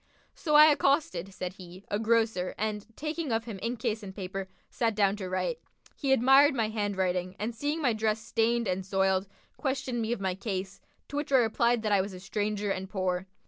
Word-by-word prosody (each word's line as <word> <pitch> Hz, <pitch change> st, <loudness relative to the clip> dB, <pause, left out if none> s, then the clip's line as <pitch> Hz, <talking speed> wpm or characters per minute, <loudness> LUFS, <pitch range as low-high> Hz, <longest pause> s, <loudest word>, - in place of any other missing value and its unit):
"So 305 Hz, -5 st, 0 dB
I 300 Hz, +1 st, +10 dB
accosted" 275 Hz, -, +1 dB
(said 185 Hz, -1 st, -5 dB
he) 180 Hz, +1 st, -11 dB
"a 205 Hz, -, +1 dB
grocer 225 Hz, -5 st, +1 dB
and, 210 Hz, -1 st, -3 dB
taking 310 Hz, -1 st, -3 dB
of 225 Hz, 0 st, +1 dB
him 225 Hz, -4 st, -7 dB
inkcase 230 Hz, -1 st, -2 dB
and 190 Hz, -2 st, -9 dB
paper, 190 Hz, -1 st, -5 dB, 0.2 s
sat 225 Hz, -3 st, 0 dB
down 200 Hz, -1 st, +3 dB
to 190 Hz, -3 st, -5 dB
write. 460 Hz, -, -1 dB, 0.4 s
He 275 Hz, -2 st, -1 dB
admired 270 Hz, +3 st, +6 dB
my 225 Hz, -3 st, +1 dB
handwriting 190 Hz, -4 st, -1 dB
and 220 Hz, +3 st, -3 dB
seeing 295 Hz, +7 st, -2 dB
my 245 Hz, -4 st, +3 dB
dress 215 Hz, 0 st, 0 dB
stained 230 Hz, +1 st, 0 dB
and 185 Hz, +1 st, -1 dB
soiled, 190 Hz, 0 st, +1 dB, 0.3 s
questioned 265 Hz, -3 st, -2 dB
me 225 Hz, +1 st, -2 dB
of 240 Hz, -, -1 dB
my 190 Hz, -1 st, -1 dB
case, 195 Hz, -1 st, -5 dB, 0.3 s
to 290 Hz, -, -4 dB
which 295 Hz, -1 st, -3 dB
I -, -, +5 dB
replied 235 Hz, 0 st, +2 dB
that 215 Hz, -, 0 dB
I 200 Hz, -2 st, +4 dB
was 195 Hz, +1 st, -5 dB
a 185 Hz, -, -8 dB
stranger 205 Hz, +1 st, -2 dB
and 190 Hz, 0 st, -3 dB
poor. 185 Hz, -1 st, -1 dB
215 Hz, 200 wpm, -29 LUFS, 190-240 Hz, 0.4 s, I